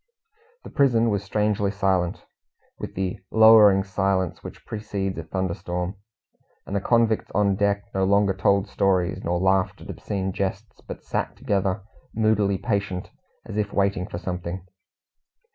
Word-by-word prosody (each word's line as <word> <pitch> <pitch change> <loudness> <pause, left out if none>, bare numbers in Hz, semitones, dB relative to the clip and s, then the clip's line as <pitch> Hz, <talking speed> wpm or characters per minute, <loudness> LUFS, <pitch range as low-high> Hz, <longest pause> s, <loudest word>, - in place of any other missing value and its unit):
The - - -10
prison 120 -6 +3
was 100 -1 -1
strangely 105 0 0
silent, 95 -3 0 0.5
with - - -7
the 95 -1 -2
lowering 110 -3 +7
silence 95 -2 -1
which - - -10
precedes 100 -4 -4
a - - -5
thunderstorm; 90 0 -3 0.7
and 100 - -5
the 100 - 0
convicts 115 0 +2
on 100 0 +3
deck 100 0 +1
no 95 - 0
longer 100 0 +3
told 100 +1 +2
stories, 95 -2 0
nor 85 +1 0
laughed 95 0 +1
at - - -8
obscene 95 -2 -3
jests, 100 +3 -4
but - - -8
sat - - -3
together, 95 -1 -1 0.3
moodily 105 -3 +2
patient, 100 -5 -2 0.3
as - - -6
if 105 -1 -1
waiting 100 -2 0
for 85 - -6
something. 90 0 -5
100 Hz, 145 wpm, -24 LUFS, 95-105 Hz, 0.7 s, lowering